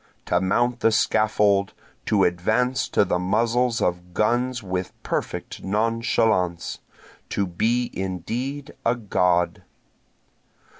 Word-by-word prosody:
To 90 0 +1
mount 120 +6 +1
the 115 - +3
scaffold, 105 -2 +2 0.3
to 100 -3 +3
advance 110 +9 +1
to - - +3
the 90 - 0
muzzles 115 +5 +1
of 90 0 -2
guns 120 +2 +1
with 90 -1 -3
perfect - - -4
nonchalance! 110 -4 0 0.5
To 100 - 0
be 115 +7 0
indeed 115 - -4
a 115 - +2
God! 90 -6 +1
105 Hz, 105 wpm, -24 LUFS, 90-120 Hz, 0.5 s, the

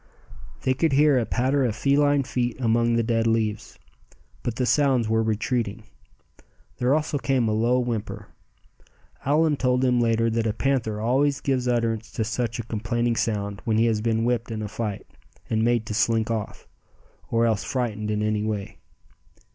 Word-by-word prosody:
They 130 - +2
could 145 +2 +1
hear 145 -1 +4
a 115 - -2
patter 130 +3 +1
of 115 -4 0
feline 145 +3 +2
feet 125 -1 -2
among 115 -1 +2
the 115 - +2
dead 115 0 +1
leaves; 110 -2 -1 0.6
but 120 - -3
the 125 - 0
sounds 130 -4 +2
were 110 0 +2
retreating. 110 0 -1 0.9
There 125 +3 +2
also 150 -2 -1
came 130 -4 +1
a - - +1
low 115 +3 +2
whimper. 120 -4 -3 1.0
Allan 150 +1 +2
told 125 -1 +1
them 125 -2 +2
later 115 0 +2
that 115 0 0
a 105 - 0
panther 115 -4 -1
always 135 +5 +1
gives 130 -2 -1
utterance 115 -2 -1
to 110 - -1
such 115 +1 -2
a 115 - -4
complaining 115 +2 -1
sound 100 -3 -2
when 110 -2 0
he 115 - +4
has 110 -2 +1
been 115 0 0
whipped 120 -1 0
in 110 -1 -4
a - - -3
fight, 105 -1 -4 0.5
and 110 -1 +1
made 120 -1 +1
to 110 - -5
slink 115 +1 +1
off; 110 -3 -5 0.6
or 115 0 +2
else 110 -4 +1
frightened 110 -3 -2
in 105 0 -1
any 105 0 0
way. 105 -2 -4
115 Hz, 175 wpm, -24 LUFS, 110-125 Hz, 1.0 s, hear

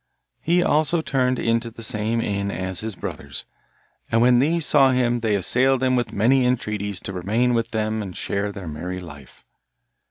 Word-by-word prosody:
He 175 +2 +2
also 155 +2 +2
turned 130 -3 0
into 115 0 0
the 115 0 -9
same 110 +2 0
inn 100 -2 -2
as 95 0 -3
his 110 -2 -5
brothers, 70 -5 -6 0.7
and 115 - +3
when 120 +1 +5
these 160 +4 +2
saw 135 -3 +6
him 120 -2 +1
they 110 -3 0
assailed 130 +7 +3
him 130 -1 +2
with 120 -1 -1
many 125 +6 +2
entreaties 105 -5 -2
to 100 - -6
remain 110 +7 0
with 115 -1 0
them 110 0 -2
and 95 -4 -7
share 100 +1 -2
their 100 -3 -8
merry 90 +4 -5
life. 75 -7 -13
115 Hz, 180 wpm, -22 LUFS, 100-125 Hz, 0.7 s, saw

